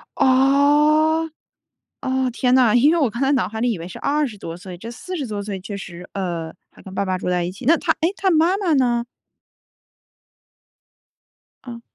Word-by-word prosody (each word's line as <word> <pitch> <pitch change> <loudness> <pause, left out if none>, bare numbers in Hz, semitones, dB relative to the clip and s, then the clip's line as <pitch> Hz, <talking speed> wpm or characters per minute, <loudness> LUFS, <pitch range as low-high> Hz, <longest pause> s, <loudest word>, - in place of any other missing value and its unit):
哦， 295 +4 +3 0.7
哦， 260 -1 0
天 250 +1 +1
呐， 245 -4 +4
因 280 +6 +5
为 340 - +2
我 270 -6 +2
刚 235 +4 -6
才 275 +1 +2
脑 270 - +1
海 220 +1 -6
里 240 0 +1
以 195 - -5
为 170 - -7
是 - - -9
20 280 -6 -1
多 165 -2 -7
岁， 180 -1 -9
这 230 +4 -8
40 310 +4 -6
多 210 -3 -4
岁 200 -2 -5
确 200 +2 -7
实 180 -2 -9
呃， 170 -4 -4 0.2
还 - - -18
跟 190 - -11
爸 200 - -1
爸 185 -1 -1
住 180 - -4
在 180 -1 +1
一 175 - -3
起， 205 +6 -11
那 330 +4 +6
她， - - +1
诶， 335 +4 +1
她 385 -1 +1
妈 335 +4 +3
妈 365 -6 0
呢？ 240 -3 +1 2.6
嗯。 235 -1 -8
245 Hz, 195 characters per minute, -21 LUFS, 195-295 Hz, 2.6 s, 那